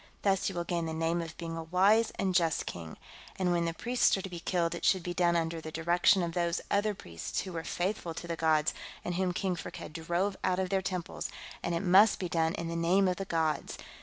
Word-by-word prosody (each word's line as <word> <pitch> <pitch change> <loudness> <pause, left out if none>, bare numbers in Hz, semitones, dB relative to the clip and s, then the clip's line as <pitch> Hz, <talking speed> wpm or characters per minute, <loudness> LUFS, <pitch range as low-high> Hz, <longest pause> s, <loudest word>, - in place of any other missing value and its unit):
Thus 195 -1 +2
you 195 - -7
will 175 - -1
gain 170 -1 -2
the 160 - -3
name 165 +1 0
of 165 -1 -7
being 165 -1 -5
a 165 - -4
wise 195 +7 +4
and 190 -1 0
just 165 -3 +2
king. 80 -2 -7 0.4
And 185 -2 0
when 170 -1 +1
the 165 - -1
priests 245 -1 +2
are - - -3
to 195 - -5
be 175 - -5
killed 170 -1 0
it 170 - -6
should 185 -3 +3
be 175 - -3
done 175 -1 +2
under 165 0 -1
the 155 - -7
direction 175 +3 +3
of 170 - -2
those 170 -1 0
other 205 +1 +2
priests 85 - -4
who 185 - -7
were 165 -1 -3
faithful 175 -2 -2
to - - -6
the 170 - -2
gods 155 -2 +2 0.3
and 175 - -1
whom 185 +1 0
King 185 0 -1
Firkked 165 - -8
drove 175 +5 -1
out 180 - +2
of 185 -1 -1
their 195 -1 +2
temples, 185 -2 -4 0.3
and 170 - -1
it 170 - -1
must 195 +3 +6
be 180 - -3
done 165 -1 +1
in 170 - -4
the 165 - -3
name 180 +4 +3
of 180 - 0
the 195 - -3
gods. 160 -3 -1
175 Hz, 250 wpm, -31 LUFS, 165-190 Hz, 0.4 s, must